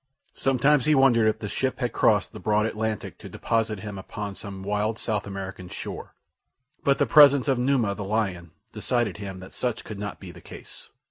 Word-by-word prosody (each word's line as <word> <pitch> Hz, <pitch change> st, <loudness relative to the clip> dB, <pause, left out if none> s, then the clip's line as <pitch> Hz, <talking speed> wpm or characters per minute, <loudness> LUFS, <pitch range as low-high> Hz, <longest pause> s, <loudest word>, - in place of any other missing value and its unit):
Sometimes 135 Hz, +1 st, +2 dB
he 155 Hz, -, +4 dB
wondered 120 Hz, -5 st, +5 dB
if 110 Hz, -, +2 dB
the 105 Hz, -, -5 dB
ship 130 Hz, +5 st, -1 dB
had 125 Hz, -2 st, -2 dB
crossed 105 Hz, -3 st, +2 dB
the -, -, -8 dB
broad 105 Hz, 0 st, +1 dB
Atlantic 110 Hz, -1 st, -3 dB
to -, -, -10 dB
deposit 110 Hz, -3 st, -1 dB
him 100 Hz, -1 st, -6 dB
upon 100 Hz, +1 st, -6 dB
some 95 Hz, -1 st, -8 dB
wild 105 Hz, +2 st, -1 dB
South 105 Hz, -3 st, -2 dB
American 95 Hz, -2 st, -7 dB
shore; -, -, -7 dB, 0.7 s
but 140 Hz, 0 st, +3 dB
the -, -, +3 dB
presence 140 Hz, -3 st, +7 dB
of 135 Hz, -3 st, +2 dB
Numa, 125 Hz, -5 st, +2 dB
the 100 Hz, -, -6 dB
lion, 95 Hz, -4 st, -2 dB, 0.2 s
decided 115 Hz, -3 st, -1 dB
him 100 Hz, -2 st, -6 dB
that 95 Hz, 0 st, -11 dB
such 120 Hz, -3 st, -2 dB
could 105 Hz, -2 st, -8 dB
not 100 Hz, 0 st, -5 dB
be 95 Hz, -3 st, -9 dB
the -, -, -14 dB
case. -, -, -13 dB
110 Hz, 195 wpm, -25 LUFS, 100-125 Hz, 0.7 s, presence